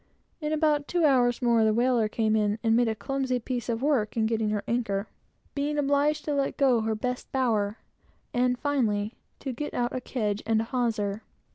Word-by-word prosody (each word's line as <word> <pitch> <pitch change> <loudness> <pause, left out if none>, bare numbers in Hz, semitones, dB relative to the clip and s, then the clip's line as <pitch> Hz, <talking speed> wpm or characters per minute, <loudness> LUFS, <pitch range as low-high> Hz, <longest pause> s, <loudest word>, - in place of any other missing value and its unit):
In 305 -2 -3
about 300 -2 +1
two 345 -2 +2
hours 250 -3 +3
more, 235 -2 +4
the 215 -1 +3
whaler 240 -2 +2
came 220 0 0
in, 210 -1 +1
and 225 -1 +3
made 240 0 +3
a 220 - 0
clumsy 265 +1 -1
piece 245 0 -4
of 230 +2 -1
work 255 -8 +1
in 220 - +2
getting 220 -1 0
her 210 -1 -1
anchor, 225 -4 -1 0.5
being 295 +1 -1
obliged 290 +1 +1
to 295 - -1
let 275 -1 -1
go 260 -5 +4
her 220 0 -1
best 250 +3 -4
bower, 220 -5 0 0.6
and 250 0 +2
finally, 225 -7 0 0.3
to 265 - -3
get 295 +5 -5
out 240 0 -1
a 255 - -2
kedge 210 -5 -2
and 225 -1 +3
a - - +1
hawser. 225 -4 -1
240 Hz, 195 wpm, -27 LUFS, 220-275 Hz, 0.6 s, more